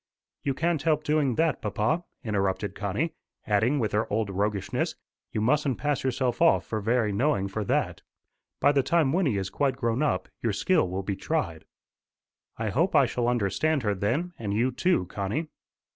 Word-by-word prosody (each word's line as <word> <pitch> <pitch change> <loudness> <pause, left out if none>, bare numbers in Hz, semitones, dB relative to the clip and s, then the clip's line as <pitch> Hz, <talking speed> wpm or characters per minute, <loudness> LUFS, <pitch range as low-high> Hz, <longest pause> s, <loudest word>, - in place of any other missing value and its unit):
"You 135 -2 -1
can't 165 -1 0
help 155 -1 +1
doing 150 -5 +1
that, 160 -2 +1
papa," 110 - 0 0.2
interrupted 100 -2 -1
Connie, 105 - -2 0.3
adding 110 +7 +2
with 110 -6 0
her 105 +2 0
old 105 -1 0
roguishness, 100 0 -1 0.4
"You 110 - -1
mustn't 135 +2 +2
pass 145 -2 -1
yourself 130 -1 -1
off 165 - +5
for 110 -1 -3
very 115 0 +1
knowing 105 -1 +1
for 105 +2 -3
that. - - 0 0.6
By - - +5
the 140 -1 +3
time 150 0 +2
Wynnie 160 - +2
is 95 -1 -3
quite 140 -3 +1
grown 115 +2 0
up, 95 -12 0
your 115 -3 0
skill 160 - +2
will 95 +2 -3
be 100 +1 -2
tried." 95 - -2 0.9
"I - - -1
hope - - +1
I - - +6
shall 120 -1 -1
understand 120 - +1
her 105 -2 +1
then, 125 - -1
and 105 -3 -2
you 120 +4 +2
too, 155 - +1
Connie." 100 - -3
120 Hz, 175 wpm, -27 LUFS, 100-150 Hz, 0.9 s, I